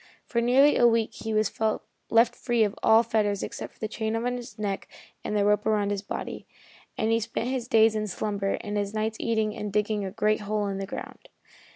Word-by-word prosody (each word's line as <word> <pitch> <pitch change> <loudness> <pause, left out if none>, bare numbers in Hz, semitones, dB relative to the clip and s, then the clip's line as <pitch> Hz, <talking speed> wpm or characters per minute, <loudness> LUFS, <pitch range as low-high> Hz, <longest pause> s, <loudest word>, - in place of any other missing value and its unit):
For 235 - 0
nearly 265 +5 +5
a 240 - +6
week 230 -1 +1
he 220 - -5
was 215 -1 +1 0.6
left 230 +1 +4
free 240 -3 +1
of 205 -2 0
all 220 +1 +6
fetters 210 -3 0
except - - -7
the 215 - -2
chain 220 0 -2
on 245 +2 -1
his 240 -3 -8
neck 200 -2 -3 0.4
and 210 - -1
the 200 - +2
rope 210 0 +3
around 205 -2 +1
his 200 -1 -1
body, 200 - -6 0.5
and 220 +1 +1
he 225 - +3
spent 230 +2 -3
his 255 -2 -2
days 225 -3 +5
in 215 -1 -2
slumber 200 0 -2
and 210 0 -3
his 205 +1 -2
nights 220 0 -1
eating 220 -2 0
and 210 -1 -4
digging 210 0 0
a 190 - -3
great 215 +1 +1
hole 210 0 -1
in 195 0 -3
the 195 - -4
ground. - - -8
215 Hz, 215 wpm, -27 LUFS, 205-230 Hz, 0.6 s, a